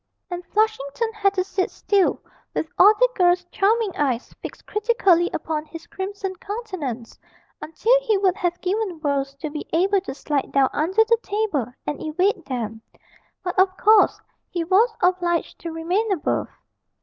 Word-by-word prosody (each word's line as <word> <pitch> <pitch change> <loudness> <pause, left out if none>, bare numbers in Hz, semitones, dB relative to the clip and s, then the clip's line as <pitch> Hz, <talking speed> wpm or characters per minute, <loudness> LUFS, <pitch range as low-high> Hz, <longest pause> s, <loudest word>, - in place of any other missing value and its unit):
And 355 0 -4
Flushington 435 0 0
had 400 -2 +1
to 370 - +1
sit 375 0 -1
still 395 -3 +1 0.3
with 320 - -1
all 405 - +9
the - - +4
girls' 360 -2 +3
charming 425 0 +1
eyes 260 -4 -1
fixed - - -9
critically 405 -6 +2
upon 310 -1 -3
his 330 +1 -11
crimson 385 +1 -5
countenance, 360 - -6 0.4
until 435 +10 +2
he 445 -5 +1
would 380 -2 +2
have 355 -3 -2
given 380 -2 -2
worlds 275 -2 -1
to 295 +2 -6
be 300 - -6
able 385 +4 +2
to 365 - -7
slide 290 -1 -2
down 275 -1 +4
under 375 +9 +3
the 465 +1 +3
table 400 - -1
and 290 - -4
evade 360 +4 0
them, 225 -4 -4 0.6
but 360 +1 -2
of 375 0 +3
course 430 0 +5 0.3
he 345 -2 -2
was 390 +8 +4
obliged 355 -2 +1
to 335 - -6
remain 360 +7 -1
above. 360 -6 0
365 Hz, 160 wpm, -23 LUFS, 315-410 Hz, 0.6 s, all